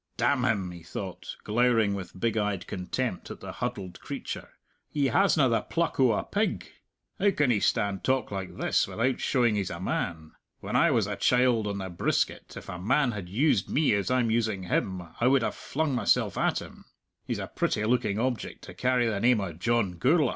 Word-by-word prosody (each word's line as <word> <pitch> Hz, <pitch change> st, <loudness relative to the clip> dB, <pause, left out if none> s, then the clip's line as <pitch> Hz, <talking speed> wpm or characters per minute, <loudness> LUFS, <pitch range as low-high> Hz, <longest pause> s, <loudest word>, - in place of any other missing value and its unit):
"Damn 130 Hz, -3 st, +2 dB
him!" 100 Hz, -7 st, 0 dB
he 85 Hz, -1 st, -10 dB
thought, 95 Hz, +2 st, -7 dB
glowering 115 Hz, -2 st, +2 dB
with 95 Hz, -2 st, -7 dB
big 115 Hz, +1 st, 0 dB
eyed 105 Hz, -4 st, -1 dB
contempt 95 Hz, +4 st, -3 dB
at -, -, -8 dB
the -, -, -7 dB
huddled 105 Hz, -7 st, -5 dB
creature; -, -, -6 dB, 0.4 s
"he 140 Hz, -3 st, +1 dB
hasna 165 Hz, -7 st, +4 dB
the 115 Hz, -2 st, +2 dB
pluck 170 Hz, -3 st, -2 dB
o' 130 Hz, -4 st, +5 dB
a -, -, -1 dB
pig! 210 Hz, +2 st, -1 dB, 0.5 s
How 205 Hz, -, +4 dB
can 150 Hz, -9 st, +2 dB
he 105 Hz, -, +2 dB
stand 100 Hz, -3 st, 0 dB
talk 130 Hz, -4 st, +1 dB
like 95 Hz, -2 st, -5 dB
this -, -, +1 dB
without 125 Hz, +3 st, 0 dB
showing 120 Hz, -4 st, +2 dB
he's 100 Hz, -3 st, -1 dB
a 85 Hz, -, -6 dB
man? 85 Hz, -3 st, -3 dB, 0.3 s
When -, -, -5 dB
I 170 Hz, -, +5 dB
was 115 Hz, -8 st, +2 dB
a 105 Hz, +1 st, -3 dB
child 125 Hz, 0 st, +3 dB
on 100 Hz, -1 st, -2 dB
the 95 Hz, -1 st, -4 dB
brisket, 85 Hz, -, -1 dB
if -, -, -9 dB
a 90 Hz, -, -6 dB
man 125 Hz, +7 st, +2 dB
had 100 Hz, -5 st, -6 dB
used 115 Hz, -, +2 dB
me 150 Hz, -4 st, +2 dB
as 100 Hz, +2 st, 0 dB
I'm 125 Hz, -3 st, +2 dB
using 110 Hz, -4 st, 0 dB
him, 90 Hz, 0 st, -1 dB, 0.2 s
I 120 Hz, -, +3 dB
would 135 Hz, -2 st, +4 dB
have -, -, -1 dB
flung 155 Hz, -1 st, -2 dB
mysell 125 Hz, -, +2 dB
at -, -, 0 dB
him. -, -, -14 dB, 0.4 s
He's -, -, -1 dB
a -, -, -3 dB
pretty 105 Hz, -, -1 dB
looking 110 Hz, -3 st, +1 dB
object 125 Hz, +1 st, -2 dB
to -, -, -10 dB
carry 125 Hz, -1 st, +1 dB
the 105 Hz, -3 st, -1 dB
name 120 Hz, +1 st, +4 dB
o' 95 Hz, -4 st, -3 dB
John 95 Hz, 0 st, 0 dB
Gourla'! 145 Hz, 0 st, +4 dB
115 Hz, 205 wpm, -28 LUFS, 100-130 Hz, 0.5 s, o